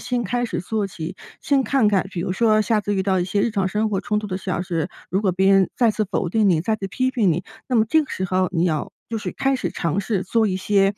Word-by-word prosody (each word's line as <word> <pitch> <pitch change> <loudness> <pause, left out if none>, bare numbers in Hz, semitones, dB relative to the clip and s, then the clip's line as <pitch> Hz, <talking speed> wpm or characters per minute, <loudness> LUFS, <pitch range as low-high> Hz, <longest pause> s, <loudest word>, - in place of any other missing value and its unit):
先 245 -2 -2
开 245 +5 -1
始 230 - -3
做 210 +2 -2
起， 160 -4 -6 0.3
先 275 -2 +2
看 260 -4 +2
看， 195 -2 +2
比 180 - -6
如 185 +1 -2
说 215 +1 +3
下 215 0 +2
次 205 0 -2
遇 190 - +1
到 190 -2 +2
一 175 - 0
些 200 +2 0
日 230 - +1
常 195 -3 0
生 215 +2 0
活 195 -3 -1
冲 210 0 -1
突 210 - -4
的 185 -2 -3
小 185 -2 -3
事， 165 -4 -2 0.2
如 190 - +1
果 190 - +3
别 190 +2 +3
人 195 -2 +4
再 235 -3 +4
次 215 - 0
否 180 - 0
定 210 +2 +2
你、 165 -4 +3
再 220 +6 0
次 195 -2 -5
批 255 +6 0
评 210 -7 +2
你， 175 +3 -1 0.2
那 250 - +1
么 220 - +4
这 315 +5 +4
个 285 - -11
时 185 - -2
候 185 0 +1
你 170 -1 +1
要 155 -4 -1 0.2
就 225 -1 -2
是 - - -4
开 270 0 0
始 - - -3
尝 170 +3 -1
试 195 -2 -1
做 220 +3 +1
一 185 -2 -1
些， 195 +1 +2
200 Hz, 310 characters per minute, -22 LUFS, 185-220 Hz, 0.3 s, 人